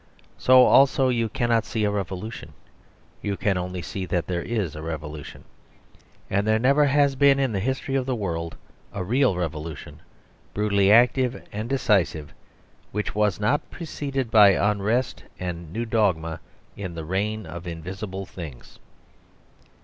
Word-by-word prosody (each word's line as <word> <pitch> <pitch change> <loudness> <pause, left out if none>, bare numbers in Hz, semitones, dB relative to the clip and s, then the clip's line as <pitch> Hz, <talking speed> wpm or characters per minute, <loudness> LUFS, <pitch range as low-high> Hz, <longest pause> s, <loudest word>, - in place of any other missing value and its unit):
So, 130 0 +7
also, 135 -1 +5
you 115 -2 0
cannot 115 0 +1
see 110 0 -2
a 105 - +2
revolution; 100 +2 -5 0.7
you 100 -1 -2
can 100 -2 +1
only 90 0 -4
see 95 +2 -5
that 90 -1 -1
there 90 -1 -2
is 105 -10 -2
a 75 - -7
revolution. 75 -1 -7 0.8
And 100 +2 0
there 110 0 +4
never 140 +5 +4
has 140 0 +3
been 140 0 +5
in 135 -3 +1
the 100 - -1
history 130 +5 -2
of 135 -1 0
the 130 - 0
world 85 -6 -4 0.3
a 100 - -4
real 125 +2 +2
revolution, 80 -3 -5 0.6
brutally 100 -1 +3
active 125 +2 +3
and 110 +3 -5
decisive, 100 - +1 0.6
which 105 +1 -3
was 105 -2 +1
not 125 +8 0
preceded 135 -7 -4
by 105 -3 +7
unrest 105 +5 0
and 85 -3 -6
new 115 +6 -3
dogma 95 -8 0 0.4
in 90 -4 -6
the 80 -1 -6
reign 105 +4 -2
of 85 +2 -8
invisible 95 +4 -6
things. 80 -10 -10
105 Hz, 150 wpm, -24 LUFS, 90-120 Hz, 0.8 s, So